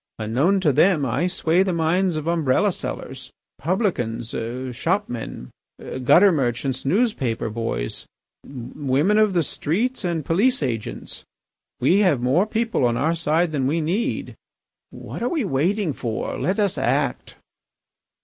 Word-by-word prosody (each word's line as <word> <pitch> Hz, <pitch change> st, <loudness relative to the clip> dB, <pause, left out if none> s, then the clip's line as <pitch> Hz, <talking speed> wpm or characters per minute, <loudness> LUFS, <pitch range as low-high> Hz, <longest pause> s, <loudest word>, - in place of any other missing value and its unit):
Unknown 130 Hz, -, +1 dB
to 155 Hz, -6 st, +3 dB
them 165 Hz, -2 st, +3 dB
I 135 Hz, +8 st, 0 dB
sway 175 Hz, -1 st, +1 dB
the 190 Hz, -1 st, +1 dB
minds 170 Hz, +1 st, +1 dB
of 155 Hz, -, -4 dB
umbrella 160 Hz, -6 st, +2 dB
sellers, -, -, -6 dB, 0.3 s
publicans, 140 Hz, -, -1 dB, 0.5 s
shopmen, 130 Hz, -, -3 dB, 0.5 s
gutter 190 Hz, +10 st, +6 dB
merchants, 130 Hz, -2 st, -1 dB
newspaper 135 Hz, -, 0 dB
boys, 110 Hz, -, -3 dB, 0.4 s
women 140 Hz, -, 0 dB
of 215 Hz, -2 st, +3 dB
the 170 Hz, -2 st, +2 dB
streets, 215 Hz, -, -2 dB
and 170 Hz, -5 st, -2 dB
police 210 Hz, -, +2 dB
agents. 115 Hz, -5 st, -4 dB, 0.6 s
We 170 Hz, +10 st, +4 dB
have 180 Hz, -10 st, +3 dB
more 135 Hz, -, +2 dB
people 225 Hz, -, 0 dB
on 120 Hz, -1 st, +2 dB
our 155 Hz, +6 st, +1 dB
side 165 Hz, +1 st, +1 dB
than 135 Hz, -4 st, 0 dB
we 160 Hz, +4 st, +1 dB
need. 175 Hz, +9 st, -2 dB, 0.6 s
What -, -, -8 dB
are 245 Hz, -, 0 dB
we 315 Hz, -6 st, 0 dB
waiting 180 Hz, +3 st, 0 dB
for? 115 Hz, -3 st, -3 dB
Let 190 Hz, -, -1 dB
us 200 Hz, -3 st, +1 dB
act!" -, -, -1 dB
160 Hz, 135 wpm, -22 LUFS, 130-190 Hz, 0.6 s, gutter